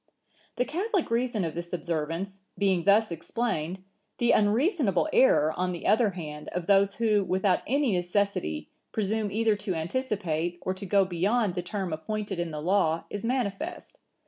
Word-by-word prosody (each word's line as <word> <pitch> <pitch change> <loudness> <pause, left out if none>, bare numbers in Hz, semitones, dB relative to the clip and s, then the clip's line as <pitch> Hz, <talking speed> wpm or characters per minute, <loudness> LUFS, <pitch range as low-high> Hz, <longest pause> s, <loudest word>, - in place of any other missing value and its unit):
"The 250 - +1
catholic 375 - -1
reason 235 -4 0
of 160 - -3
this 170 0 -6
observance 170 +3 -3 0.2
being 190 -4 +1
thus 210 0 +4
explained, 180 0 -3 0.3
the 240 0 +3
unreasonable 225 - +2
error, 155 - +5
on 180 0 -1
the 170 - -7
other 220 +1 +4
hand, 150 -3 -7
of 180 -1 -2
those 200 0 +4
who, 215 -2 +2
without 190 +1 +2
any 275 0 +2
necessity, 180 - -1 0.2
presume 215 0 -1
either 220 +1 +2
to 195 -3 -3
anticipate, 175 -3 -2
or 185 - -1
to 190 +1 -7
go 195 +1 +4
beyond 195 +4 +1
the 180 - -2
term 185 -1 -3
appointed 205 +3 -3
in 175 -1 -1
the 150 -1 -5
Law, 165 -3 +2
is 205 - -4
manifest. 230 -5 -3
195 Hz, 160 wpm, -28 LUFS, 175-220 Hz, 0.3 s, error